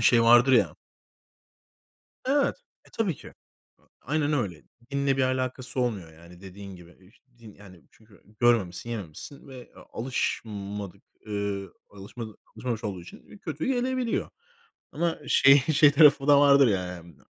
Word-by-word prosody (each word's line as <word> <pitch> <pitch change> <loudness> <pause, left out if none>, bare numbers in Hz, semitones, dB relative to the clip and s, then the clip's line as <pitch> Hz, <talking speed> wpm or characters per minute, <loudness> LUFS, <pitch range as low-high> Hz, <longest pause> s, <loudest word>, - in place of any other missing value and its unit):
şey, 120 -2 +4
vardır 120 +3 +6
ya 120 - +3 1.5
Evet. 275 +2 +1 0.3
E, - - -20
tabii 200 -8 -1
ki. - - -14 0.4
A, - - -33 0.2
aynen 150 +2 -1
öyle. 95 - -2 0.3
Dinle 140 -1 0
bir - - +2
alakası 130 0 -2
olmuyor, 100 -10 -2
yani, 85 +3 -16
dediğin 100 0 -10
gibi. 85 -1 -15
Eh, 95 +3 -22
ş - - -28 0.2
din, 110 -3 -14
yani, 90 -6 -16
çünkü 110 -2 -22 0.2
görmemişsin, 115 -4 +1
yememişsin 110 - -8
ve 130 -2 -12
a - - -12
alışmadık, 105 -5 -4 0.2
ııı, 100 -1 -4 0.2
alışmadık 105 +3 -10 0.2
alışmamış 120 -3 -4
olduğu 95 -4 -4
için, 85 - -14
eee, - - -14
kötü - - -5
gelebiliyor. 255 -2 -1 0.6
Ama, 170 -2 -2
şey, 135 +1 +6
şey 145 +1 +4
tarafı 145 -1 +5
da 145 -1 +7
vardır, 140 -2 +6
ya, 95 -4 0
yani. 85 -3 -10
115 Hz, 150 wpm, -26 LUFS, 100-140 Hz, 1.5 s, da